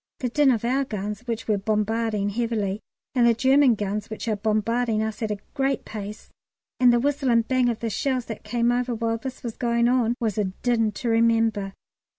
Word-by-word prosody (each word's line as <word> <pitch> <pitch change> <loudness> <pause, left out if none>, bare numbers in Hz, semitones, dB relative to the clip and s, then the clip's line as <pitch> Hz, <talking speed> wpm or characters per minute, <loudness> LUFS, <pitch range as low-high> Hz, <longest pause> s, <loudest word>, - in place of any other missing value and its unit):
The 250 - -2
din 290 +3 +3
of 235 -3 +1
our 265 +3 +1
guns, 210 -4 -4
which 230 -1 -3
were 210 -2 +1
bombarding 215 0 0
heavily, 215 -3 -1 0.3
and 245 -2 +4
the 230 - +4
German 265 0 +4
guns, 205 0 -3
which 220 0 -6
are 220 - +1
bombarding 215 +2 0
us 220 0 -4
at 220 - -1
a 210 - -2 0.2
great 270 -1 -1
pace, 210 0 -8 0.5
and 250 -1 +6
the 240 - +3
whistle 280 +1 0
and 230 -1 +3
bang 255 -2 +2
of 235 -1 -3
the 230 - -1
shells 255 +2 -1
that 225 - -7
came 240 0 +1
over 245 0 0
while 230 0 -1
this 260 +1 -7
was 235 -3 -5
going 235 -1 +1
on, 240 -1 +2
was 220 -4 -1
a 210 - +2
din 225 +3 0
to 235 +4 -3
remember. 225 -3 +2
230 Hz, 205 wpm, -24 LUFS, 215-245 Hz, 0.5 s, and